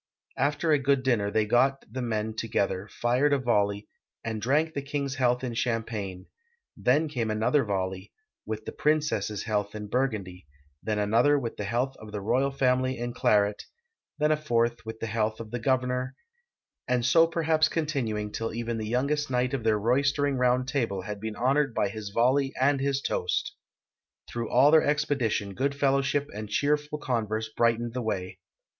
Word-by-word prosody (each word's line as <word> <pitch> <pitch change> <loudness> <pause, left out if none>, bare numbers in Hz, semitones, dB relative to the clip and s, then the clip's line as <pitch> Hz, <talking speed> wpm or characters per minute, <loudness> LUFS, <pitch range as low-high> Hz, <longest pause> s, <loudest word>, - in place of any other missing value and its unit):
After 145 +3 +1
a 150 - +4
good 135 -1 +2
dinner 115 -6 +1
they 110 +1 +1
got 130 +5 +2
the 130 +5 -5
men 110 -2 -2
to 115 - -3
gether, 100 -3 -1
fired 125 +7 +1
a - - +4
volley, 105 -5 0 0.4
and 110 -1 -3
drank 150 +7 +1
the 140 - -2
king's 140 -1 -3
health 125 -1 +2
in 125 -2 -3
cham 115 -1 0
pagne; 100 -5 -6 0.5
then 145 +6 +2
came 120 -7 -2
another 115 +6 +2
volley, 95 -3 -3 0.3
with 110 0 -5
the - - -5
])rincess's 150 -9 0
health 105 -2 -2
in 105 -1 -5
Burgundy; 100 - -2 0.3
then 110 -1 -2
another, 115 +8 +3
wdth 120 -5 -3
the 105 - -3
health 125 +6 -1
of 110 -1 -11
the 105 - -4
royal 125 +7 +1
family 130 -1 +1
in 120 0 -4
claret; 105 -2 +2 0.5
then 150 0 +2
a 155 - +3
fourth, 120 -5 0
with 110 0 -6
the - - -3
health 110 -1 -1
of 110 -2 -8
the 120 - -3
governor, 125 +1 0 0.7
and 125 -2 +1
so 165 +6 +5
perhaps 160 -1 +2
continuing 120 -10 -2
till 115 0 -4
even 115 -1 -3
the 110 - -4
youngest 140 +4 0
knight 125 0 0
of 130 -4 -2
their 110 -1 +3
royster 140 +6 +2
ing 140 -1 0
Round 125 0 +2
Table 115 -9 -1
had 105 +1 -6
been 110 -1 -4
honored 135 +2 +1
by 100 - +1
his 105 0 -6
volley 130 +6 +2
and 140 +1 +3
his 140 0 0
toast. - - -1 0.7
Through 115 -2 -4
all 135 +4 +5
their 160 0 +7
expedition 140 -9 0
good 140 +6 -1
fellowship 140 0 +1
and 105 0 -6
cheerful 150 +5 0
con 120 -7 -1
verse 110 +1 -3
brightened 115 0 +1
the 125 - -2
way. 95 -4 -3
120 Hz, 185 wpm, -27 LUFS, 110-140 Hz, 0.7 s, their